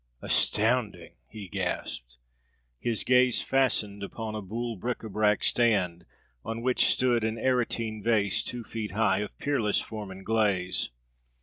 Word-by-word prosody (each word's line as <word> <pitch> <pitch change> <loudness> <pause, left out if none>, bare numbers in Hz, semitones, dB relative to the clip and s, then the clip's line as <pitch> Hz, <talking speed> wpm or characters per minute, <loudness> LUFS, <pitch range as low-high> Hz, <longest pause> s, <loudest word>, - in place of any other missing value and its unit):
"Astounding!" 110 -6 +2
he 105 -3 -9
gasped. - - -4 0.6
His 115 -2 -1
gaze 125 -1 +4
fastened 110 -7 +1
upon 110 +2 -5
a 110 - -4
boule 115 +4 -4
bric 120 +6 -3
à 110 - -8
brac 105 0 +2
stand, 95 -8 +2 0.4
on 115 +1 -5
which 130 0 +3
stood 120 -3 +2
an 110 +1 -1
Aretine 115 -3 0
vase 105 -4 +2
two 120 -1 -5
feet 110 -4 -5
high, 100 -2 +2
of 105 -1 -5
peerless 120 -8 +1
form 105 -3 -6
and 95 0 -10
glaze. 100 -5 +1
110 Hz, 140 wpm, -28 LUFS, 100-120 Hz, 0.6 s, gaze